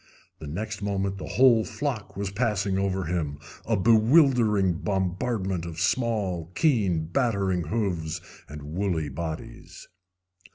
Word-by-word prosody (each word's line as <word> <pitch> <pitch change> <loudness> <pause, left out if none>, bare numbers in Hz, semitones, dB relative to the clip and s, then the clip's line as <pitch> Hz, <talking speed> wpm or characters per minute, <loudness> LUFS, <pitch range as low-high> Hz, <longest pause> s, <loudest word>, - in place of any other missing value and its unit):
The 75 - -8
next 105 +7 -4
moment 100 -1 -2
the - - -6
whole 120 -3 +5
flock 120 -7 -4
was 100 -1 -3
passing 100 -3 0
over 95 -1 0
him, 80 -4 -2 0.3
a 115 -1 +2
bewildering 110 - +4
bombardment 95 -1 -1
of 85 -1 -6
small, 95 -4 0
keen, 100 - +2
battering 95 -3 0
hoofs 90 -5 -2 0.3
and 75 0 -8
woolly 80 0 -2
bodies. 80 +3 -7
95 Hz, 120 wpm, -26 LUFS, 85-110 Hz, 0.3 s, whole